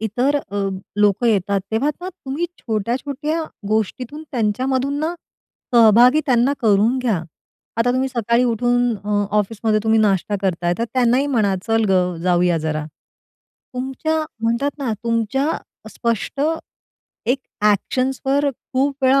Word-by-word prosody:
इतर 245 +7 +1
अ, 200 -6 -2 0.3
लोकं 210 +3 +3
येतात. 200 -2 +2
तेव्हा 235 +7 +1
ना 360 - -5
तुम्ही 335 -3 -4
छोट्या-छोट्या 265 +8 -2 0.3
गोष्टीतून 230 +7 -2
त्यांच्यामधून 260 +4 0
ना, 320 +3 -1 0.6
सहभागी 235 +5 +7
त्यांना 250 0 +3
करून 220 +4 +3
घ्या. 225 -9 0 0.5
आता 230 +2 +2
तुम्ही 260 +1 0
सकाळी 235 -1 +1
उठून 245 0 +1
अ, 205 0 +1
ऑफिसमध्ये 215 +1 0
तुम्ही 220 0 +3
नाश्ता 205 -1 +1
करताय 175 -2 0
तर 230 - +1
त्यांनाही 255 +2 +3
म्हणा, 220 -8 +1
चल 225 0 +2
गं 180 -2 +2
जाऊया 175 -1 +2
जरा. 155 -1 -2 0.9
तुमच्या 270 +5 -1 0.2
म्हणतात 235 +5 +1
ना 265 -5 -1
तुमच्या 230 +5 0 0.4
स्पष्ट 235 +3 -2 0.9
एक 265 - +2 0.3
एक्शन्सवर 265 +6 0
खूप 270 +2 -2
वेळा 265 +1 +5
235 Hz, 125 wpm, -20 LUFS, 210-265 Hz, 0.9 s, सहभागी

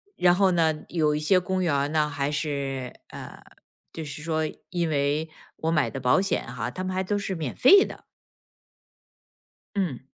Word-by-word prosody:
然 175 -1 +4
后 195 0 +4
呢， 160 -3 +1
有 155 -3 +1
一 150 - -1
些 185 +5 +3
公 185 +1 -2
园 145 -3 +1
呢， 155 -1 +2
还 145 0 -2
是， 140 -4 -3 0.2
嗯， - - -10 0.5
就 160 -1 -6
是 150 +1 -8
说 160 -1 0 0.3
因 170 -2 -1
为 145 +2 0 0.3
我 160 +1 -1
买 155 -3 +2
的 135 - -6
保 125 +8 +3
险 195 - -1
哈， 120 0 -4
它 185 - -5
们 185 - -2
还 190 - 0
都 205 +2 -1
是 195 -1 -3
免 155 -6 -4
费 390 +9 +7
的。 - - -10 1.7
嗯。 175 -11 -1
155 Hz, 190 characters per minute, -26 LUFS, 145-180 Hz, 1.7 s, 费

